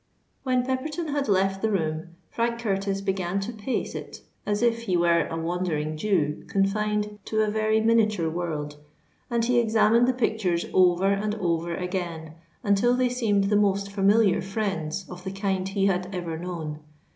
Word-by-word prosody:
When 255 -2 +1
Pepperton 300 +5 -2
had 285 -2 -1
left 195 0 +2
the 220 - +1
room, 165 -3 -2 0.2
Frank 235 0 -1
Curtis 195 -3 -1
began 190 -1 -1
to 225 +5 -4
pace 220 +4 -3
it - - -8 0.3
as 205 +2 0
if 230 -1 +3
he 185 -6 0
were 170 -2 +3
a 165 - -4
Wandering 165 -2 -2
Jew 155 -4 0
confined 210 +1 0
to 220 0 +1
a 210 - 0
very 220 0 +2
miniature 215 -6 +3
world; 155 -3 -3 0.5
and 235 -1 +1
he 245 0 +3
examined 230 +1 +4
the 255 - +3
pictures 220 -8 0
over 185 +1 +4
and 210 +1 0
over 170 -4 -1
again, 170 -3 -4 0.3
until 205 +5 +3
they 250 0 +2
seemed 220 -5 +1
the 200 +1 +1
most 200 -1 +2
familiar 200 +1 +3
friends 195 -3 -3
of 180 0 -10
the 190 - -4
kind 195 -1 -1
he 195 0 0
had 185 -1 0
ever 170 -2 -3
known. 160 -3 -5
195 Hz, 170 wpm, -26 LUFS, 175-220 Hz, 0.5 s, examined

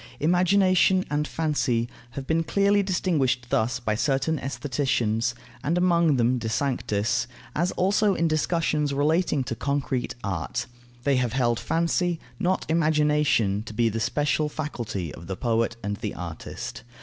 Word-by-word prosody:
Imagination 185 +2 +3
and 150 0 0
fancy 140 -7 0 0.3
have 135 - -4
been 160 +3 +1
clearly 200 +4 +3
distinguished 170 -10 0
thus 120 +3 +1
by 110 -3 -1
certain 135 +6 0
aestheticians 120 -4 -1 0.3
(and 165 +4 +1
among 170 -4 +3
them, 125 0 +2
De 110 -1 -3
Sanctis), 115 -4 0 0.3
as 175 +4 +1
also 200 +2 +2
in 165 - +1
discussions 155 -2 0
relating 150 0 +2
to 125 - -3
concrete 140 -3 -2
art: 100 +5 -2 0.4
they 140 -1 +2
have 125 -2 0
held 120 -3 +1
fancy, 170 +1 0 0.2
not 185 +1 0
imagination, 150 -10 +2
to 110 -1 -9
be 115 +1 +3
the 115 +1 -3
special 150 +5 0
faculty 120 - -4
of 85 - -11
the 95 0 -4
poet 115 -1 0
and 100 0 -2
the 105 -2 -4
artist. 85 -7 -7
140 Hz, 145 wpm, -25 LUFS, 115-165 Hz, 0.4 s, Imagination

